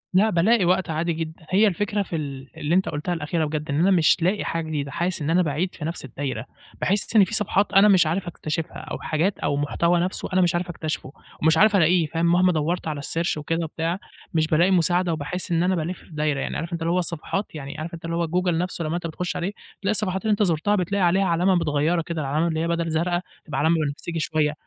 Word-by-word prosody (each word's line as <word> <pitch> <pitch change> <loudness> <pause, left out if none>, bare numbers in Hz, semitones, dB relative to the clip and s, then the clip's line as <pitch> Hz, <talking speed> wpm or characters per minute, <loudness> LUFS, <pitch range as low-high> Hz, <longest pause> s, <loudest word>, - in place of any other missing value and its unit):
لأ 210 +4 +5
بالاقي 200 +3 +3
وقت 180 0 +2
عادي 165 +2 0
جدًا، 160 +1 -6
هي 205 +4 +4
الفكرة 205 +2 0
في 180 -3 -4
ال 140 -3 -5
اللي 150 +4 0
أنت 190 - +2
قلتها 150 +4 -2
الأخيرة 160 0 -1
بجد 150 0 -4
إن 140 +1 0
أنا 185 +4 +4
مش 170 -5 +4
لاقي 185 +5 +1
حاجة 165 -1 -2
جديدة، 145 -3 -3
حاسس 175 +1 -1
إن 145 - -2
أنا 175 +3 +4
باعيد 165 +3 -1
في 150 - -6
نفس 165 -3 -4
الدايرة، 130 -3 -4 0.4
باحس 205 +3 0
إن 210 - +8
فيه 190 - -3
صفحات 205 -2 +1
أنا 195 +1 +7
مش 190 -5 +5
عارف 175 +4 -1
أكتشفها 160 -1 -4
أو - - -6
حاجات 170 +5 -1
أو 145 - 0
محتوى 170 +4 +1
نفسه 180 +2 -2
أنا 185 - +4
مش 175 -1 +2
عارف 175 +1 -2
اكتشفه 155 -5 -4 0.3
ومش 160 +1 +4
عارف 210 +3 +5
ألاقيه 175 -1 +4
فاهم، 165 +2 -1
مهما 180 +2 +4
دوَّرت 165 +2 -1
على 150 -2 -3
الsearch 165 +3 -1
وكده 165 +3 -2
وبتاع 165 +3 -2 0.3
مش 160 -1 +2
بالاقي 170 +4 +3
مساعدة 175 0 +2
وباحس 175 +5 -3
إن 170 0 +2
أنا 185 +1 +2
بالِف 170 +2 -3
في - - -20
دايرة، 150 -2 -1
يعني - - -3
عارف 170 +2 -5
أنت 170 - -3
اللي 165 +1 0
هو 180 - +2
الصفحات 175 +3 -3
يعني 140 0 -7
عارف 160 +2 -6
أنت 165 0 -8
اللي 165 0 -2
هو 170 0 0
جوجل 175 0 0
نفسه 175 -1 -2
لما 155 +2 -1
أنت 175 -1 -3
بتخش 175 +3 -4
عليه 180 +2 -2 0.3
تلاقي 200 0 +1
الصفحات 190 -3 -1
اللي 220 - 0
أنت 210 0 +3
زُرتها 180 +3 +1
بتلاقي 195 +1 0
عليها 185 +3 +3
علامة 180 +2 +2
متغيرة 165 0 +1
كده 165 0 -4
العلامة 150 +4 0
اللي 160 -1 -1
هي 165 - 0
بَدَل 170 0 -1
زرقا 175 +2 0 0.2
تبقى 150 -4 -3
علامة 160 +3 +3
بنفسجي 165 +4 -4
شوية، 155 -1 0
170 Hz, 240 wpm, -24 LUFS, 155-185 Hz, 0.4 s, إن